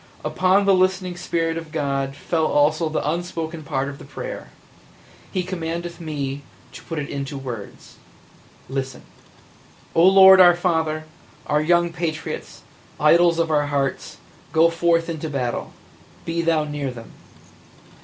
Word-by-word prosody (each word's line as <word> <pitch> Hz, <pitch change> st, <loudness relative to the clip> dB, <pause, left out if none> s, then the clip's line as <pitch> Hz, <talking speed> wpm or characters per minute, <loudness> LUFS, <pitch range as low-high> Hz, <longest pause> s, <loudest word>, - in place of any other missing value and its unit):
Upon 185 Hz, +2 st, +2 dB
the 200 Hz, -, +5 dB
listening 185 Hz, -1 st, +1 dB
spirit 165 Hz, -1 st, -2 dB
of 165 Hz, -2 st, -11 dB
God 140 Hz, -3 st, -2 dB
fell 160 Hz, +2 st, -1 dB
also 155 Hz, +2 st, +2 dB
the 155 Hz, -, -2 dB
unspoken 165 Hz, 0 st, -3 dB
part 140 Hz, -3 st, -2 dB
of 140 Hz, 0 st, -7 dB
the -, -, -11 dB
prayer. -, -, -7 dB, 0.8 s
He 185 Hz, -2 st, -1 dB
commandeth 170 Hz, -1 st, -5 dB
me 145 Hz, -3 st, -4 dB, 0.3 s
to -, -, -11 dB
put 165 Hz, -, -7 dB
it 145 Hz, -2 st, -3 dB
into 140 Hz, 0 st, -5 dB
words. 120 Hz, -6 st, -8 dB, 0.7 s
Listen! 135 Hz, -1 st, -5 dB, 0.9 s
"O 165 Hz, -, +4 dB
Lord 190 Hz, 0 st, +8 dB
our 175 Hz, -1 st, +7 dB
Father, 160 Hz, -3 st, 0 dB, 0.4 s
our 150 Hz, 0 st, +1 dB
young 170 Hz, +1 st, +2 dB
patriots, 165 Hz, -2 st, -5 dB, 0.4 s
idols 170 Hz, +2 st, +5 dB
of 165 Hz, -1 st, 0 dB
our 145 Hz, -1 st, +2 dB
hearts, 140 Hz, -2 st, -2 dB, 0.3 s
go 165 Hz, +1 st, +4 dB
forth 165 Hz, 0 st, +2 dB
to 160 Hz, -2 st, -5 dB
battle 125 Hz, -4 st, -3 dB, 0.3 s
– -, -, -26 dB
be 165 Hz, 0 st, -1 dB
Thou 165 Hz, -2 st, +2 dB
near 145 Hz, -2 st, -4 dB
them! 120 Hz, -2 st, -10 dB
160 Hz, 145 wpm, -22 LUFS, 145-170 Hz, 0.9 s, Lord